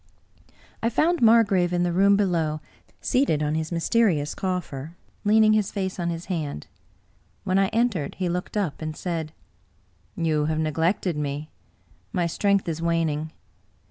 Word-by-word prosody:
I 230 - +2
found 335 +8 +1
Margrave 205 -6 +4
in 175 0 +1
the 175 -1 0
room 200 +2 +5
below, 165 -6 0 0.4
seated 250 - +1
on 150 0 0
his 160 +1 -2
mysterious 170 -4 +1
coffer, 170 -5 -4 0.3
leaning 215 +1 +5
his 215 -2 +1
face 190 -2 -3
on 170 -1 -1
his 170 0 -4
hand. 155 - -4 0.8
When 185 +1 +2
I 195 - +3
entered, 220 -9 0
he 185 - -2
looked 180 +4 -3
up, 185 -9 -2
and 155 -1 -4
said: 165 -4 -3 0.5
" 90 0 -38
You 155 -3 +1
have 155 0 -1
neglected 160 +2 0
me. 145 +1 -4 0.6
My 180 -4 +1
strength 200 +3 +1
is 165 -1 -3
waning. 160 -2 0
170 Hz, 150 wpm, -25 LUFS, 155-200 Hz, 0.8 s, room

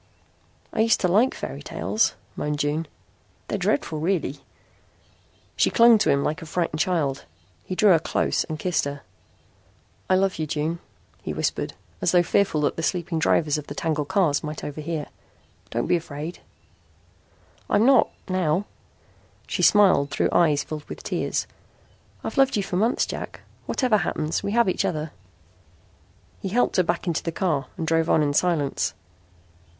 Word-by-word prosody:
"I - - -3
used 225 0 +4
to 180 - +3
like 215 +9 +3
fairy - - -6
tales," 220 +1 0 0.2
moaned 150 0 -2
June. 150 +2 -1 0.6
"They're - - -2
dreadful, 155 - 0
really." 160 -4 -1 1.2
She - - +3
clung 235 -1 +6
to 205 - +2
him 140 0 +3
like 155 +4 -2
a 165 - -8
frightened 165 -1 -2
child. 155 -6 0 0.4
He 185 - -4
drew 205 +1 +5
her 165 - +6
close - - 0
and 155 - -5
kissed 180 -1 0
her. 140 0 -5 1.1
"I 185 - +5
love 190 -2 +1
you, 155 - -1
June," 155 +3 -2 0.4
he - - -4
whispered, - - -2 0.3
as - - +1
though 175 -1 +5
fearful 175 -4 +1
that 145 - 0
the - - -2
sleeping 165 +1 -1
drivers 155 -1 +2
of 145 - -10
the 145 - -7
tangled 155 -3 -1
cars 165 -6 +2
might 150 0 -5
overhear. 155 +1 -4 0.6
"Don't - - -1
be 175 - +3
afraid." 155 +1 -7 1.3
"I'm 215 - +3
not 270 0 +5 0.2
now," 185 0 0 0.8
she - - -3
smiled 190 -9 +5
through - - 0
eyes 155 -4 +3
filled 155 -1 -7
with - - -9
tears. - - -1 0.8
"I've - - -3
loved 270 -3 +4
you 200 - 0
for 190 - -4
months, 220 +6 +2
Jack. - - -7 0.3
Whatever 250 -5 +2
happens, 155 -4 -1
we 200 - -3
have 235 -2 +4
each 185 - +1
other." 155 -1 -2 1.3
He 195 - -3
helped 240 +2 +1
her 185 - +5
back 170 +1 -1
into 170 -3 0
the 165 - -3
car 160 -7 -1
and 165 - -2
drove 165 0 +1
on 155 - +4
in 145 -1 0
silence. 155 -4 0
165 Hz, 165 wpm, -24 LUFS, 150-190 Hz, 1.3 s, clung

